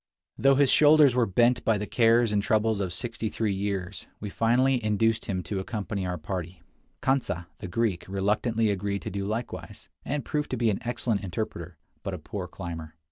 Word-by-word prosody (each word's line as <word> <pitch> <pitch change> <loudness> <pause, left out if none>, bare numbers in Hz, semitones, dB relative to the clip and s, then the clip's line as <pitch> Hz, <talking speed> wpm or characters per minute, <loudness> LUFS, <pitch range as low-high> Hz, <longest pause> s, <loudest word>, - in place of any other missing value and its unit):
Though 135 0 +4
his 140 -1 +4
shoulders 150 -3 +6
were 120 -2 +2
bent 120 +5 +3
by 110 -2 +2
the 105 - -3
cares 115 0 +3
and 105 -1 +2
troubles 110 0 +1
of 95 -3 -2
sixty 115 +3 -3
three 110 -2 -1
years, 95 -2 -3
we 105 -1 -5
finally 125 +3 +2
induced 110 +1 +1
him 95 -4 -2
to 100 +1 -3
accompany 100 -2 -3
our 90 0 -2
party. 85 +1 -5 0.4
Kantsa, 125 -10 0
the - - -6
Greek, 100 -2 -1
reluctantly 105 +3 +1
agreed 100 0 -2
to - - -4
do 100 +1 -3
likewise, 110 +3 -5
and 145 -1 -3
proved 150 -1 -2
to 130 - -2
be 115 -2 +2
an 100 - -2
excellent 115 -3 -1
interpreter, 90 -3 -5 0.2
but - - -4
a - - -5
poor - - -6
climber. 80 -3 -7
105 Hz, 190 wpm, -27 LUFS, 95-120 Hz, 0.4 s, shoulders